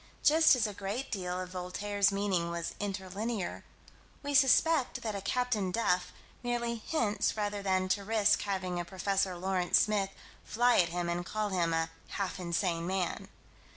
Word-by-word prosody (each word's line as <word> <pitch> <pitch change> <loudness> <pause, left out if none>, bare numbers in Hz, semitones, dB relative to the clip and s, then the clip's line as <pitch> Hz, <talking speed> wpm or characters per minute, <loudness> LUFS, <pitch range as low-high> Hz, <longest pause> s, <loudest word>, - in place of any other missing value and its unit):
Just 315 -1 +6
as 240 -3 +1
a 210 - -3
great 200 +7 -4
deal 180 -3 -2
of 185 -1 -5
Voltaire's 195 +2 0
meaning 195 -4 0
was 170 0 -3
inter 195 -2 -3
linear, 205 +1 -3 0.6
we 285 0 -3
suspect 280 +1 +4
that 220 -2 -2
a 200 - -4
Captain 220 -2 0
Duff 180 -3 0 0.3
merely 240 -1 -1
hints 220 -4 -1
rather 205 -1 -2
than 190 -1 +1
to 200 +1 +1
risk 215 0 +3
having 185 -3 -2
a - - -1
Prof. 195 +2 0
Lawrence 185 0 +1
Smith 205 -2 +2 0.3
fly 240 +2 +3
at 170 -2 +4
him 175 0 -2
and 170 +1 -1
call 215 +3 -2
him 175 -3 +1
"a 165 0 0 0.2
half 195 -1 -3
insane 170 -1 -1
man." 185 -2 -2
195 Hz, 165 wpm, -31 LUFS, 180-215 Hz, 0.6 s, Just